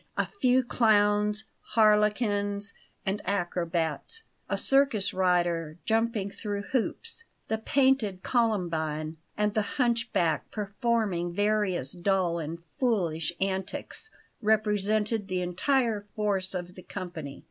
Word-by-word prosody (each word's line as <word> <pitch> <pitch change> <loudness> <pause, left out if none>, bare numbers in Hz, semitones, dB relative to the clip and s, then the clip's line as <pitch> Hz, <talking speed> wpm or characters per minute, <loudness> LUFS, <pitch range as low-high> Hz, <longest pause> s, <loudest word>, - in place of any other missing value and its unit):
A - - +2
few 260 -8 +2
clowns, 210 -2 +3 0.3
harlequins, 210 -2 +3 0.3
and 195 +1 -1
acrobats, 175 - -1 0.3
a - - 0
circus 270 -7 +2
rider 175 -4 +1
jumping 225 -3 +1
through 205 -1 -4
hoops, 460 - -2 0.2
the 220 - 0
painted 245 -6 +2
columbine, 165 -9 0 0.2
and 210 0 +1
the 215 - +2 0.2
hunchback 235 - +1
performing 205 -4 -1
various 205 -8 +1
dull 180 -2 +1
and 165 +2 -5 0.2
foolish 175 - +1
antics, 190 - -3 0.3
represented 215 0 +1
the 185 -1 -1
entire 215 +3 +1
force 195 -3 0
of 180 0 -4
the 185 - -11
company. 175 -7 -7
205 Hz, 105 wpm, -28 LUFS, 180-220 Hz, 0.3 s, clowns